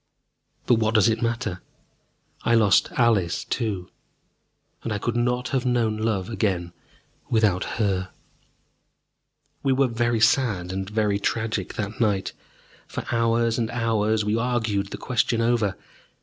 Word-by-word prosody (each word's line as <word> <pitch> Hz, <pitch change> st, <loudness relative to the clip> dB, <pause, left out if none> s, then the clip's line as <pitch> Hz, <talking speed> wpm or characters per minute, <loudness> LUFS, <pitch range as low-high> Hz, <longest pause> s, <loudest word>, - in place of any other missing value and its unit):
But 120 Hz, -2 st, +3 dB
what 110 Hz, 0 st, 0 dB
does 110 Hz, +1 st, +5 dB
it 110 Hz, -, -1 dB
matter? 115 Hz, -6 st, -2 dB, 0.8 s
I 120 Hz, -, +2 dB
lost 105 Hz, -5 st, +4 dB
Alice 110 Hz, -8 st, +2 dB
too, 100 Hz, -7 st, -3 dB, 0.9 s
and 115 Hz, -, -4 dB
I 105 Hz, -, 0 dB
could 120 Hz, +3 st, -2 dB
not 125 Hz, +1 st, 0 dB
have 130 Hz, -2 st, 0 dB
known 120 Hz, -4 st, +1 dB
love 110 Hz, -4 st, -1 dB
again 95 Hz, -6 st, -1 dB, 0.6 s
without 105 Hz, -5 st, +2 dB, 0.2 s
her. 95 Hz, -3 st, 0 dB, 1.5 s
We 135 Hz, -1 st, +2 dB
were 135 Hz, +1 st, +3 dB
very 120 Hz, -1 st, 0 dB
sad 110 Hz, -6 st, +2 dB
and 95 Hz, +1 st, -4 dB
very 105 Hz, -2 st, +1 dB
tragic 110 Hz, +2 st, -2 dB
that 105 Hz, 0 st, -4 dB
night. 100 Hz, -4 st, +1 dB, 0.5 s
For -, -, -5 dB
hours 115 Hz, 0 st, +1 dB
and 115 Hz, -2 st, -1 dB
hours 110 Hz, -2 st, 0 dB
we 105 Hz, +1 st, +1 dB
argued 115 Hz, -4 st, 0 dB
the -, -, -7 dB
question 120 Hz, -1 st, 0 dB
over. 115 Hz, -4 st, +1 dB
110 Hz, 135 wpm, -24 LUFS, 100-120 Hz, 1.5 s, does